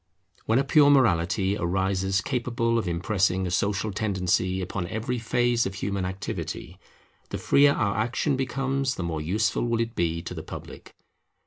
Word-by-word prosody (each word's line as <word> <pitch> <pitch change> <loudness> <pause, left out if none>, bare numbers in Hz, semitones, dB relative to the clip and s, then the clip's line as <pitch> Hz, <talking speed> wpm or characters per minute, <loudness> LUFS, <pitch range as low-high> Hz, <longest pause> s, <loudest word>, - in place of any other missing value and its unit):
When 110 - +3
a 135 - +3
pure 145 +1 +5
morality 95 -7 +3
arises 95 +1 0
capable 120 -3 0
of 110 - -3
impressing 95 +2 0
a 90 - -3
social 100 +3 0
tendency 95 -3 0
upon 90 -1 -3
every 115 +5 -3
phase 120 0 +1
of 95 - -6
human 100 -1 -2
activity, 95 +1 -5 0.5
the - - -3
freer 140 0 +4
our 100 -5 0
action 120 +7 0
becomes 135 +1 -1
the 90 - -4
more 80 -2 -3
useful 105 +8 0
will 115 -1 0
it 115 0 -1
be 85 -4 -1
to - - -6
the - - -6
public. - - -10
100 Hz, 160 wpm, -26 LUFS, 95-120 Hz, 0.5 s, pure